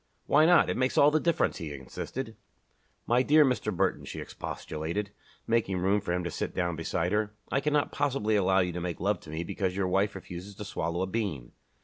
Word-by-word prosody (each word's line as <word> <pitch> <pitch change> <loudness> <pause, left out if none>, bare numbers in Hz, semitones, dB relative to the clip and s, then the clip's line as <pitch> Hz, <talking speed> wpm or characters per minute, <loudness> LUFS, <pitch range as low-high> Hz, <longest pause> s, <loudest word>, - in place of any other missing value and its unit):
"Why 155 +2 +5
not? 175 -2 +6
It - - -1
makes 130 0 +1
all 145 +1 +7
the 155 - +3
difference," 170 0 +1
he 80 -3 -5
insisted. 110 - -6 0.7
"My 120 +1 +3
dear 150 +3 +6
Mr. 125 -5 0
Burton," - - 0
she - - -7
expostulated, 85 +7 -4 0.3
making 115 -5 +1
room 95 +3 +2
for 95 - -3
him 90 +1 0
to 85 - -3
sit - - -4
down 85 -2 0
beside 85 +2 -1
her, 105 0 0 0.2
"I 140 - +2
cannot 150 0 +1
possibly 125 -7 0
allow 95 -1 +4
you 90 -1 0
to 90 +1 -4
make 85 -1 -3
love 100 +1 +1
to 80 - -14
me 80 +2 -3
because 95 +1 -2
your 95 -1 0
wife 100 +2 +1
refuses 95 +1 -8
to 105 - -7
swallow 85 -2 -2
a - - +1
bean!" 95 - -3
100 Hz, 215 wpm, -29 LUFS, 90-120 Hz, 0.7 s, all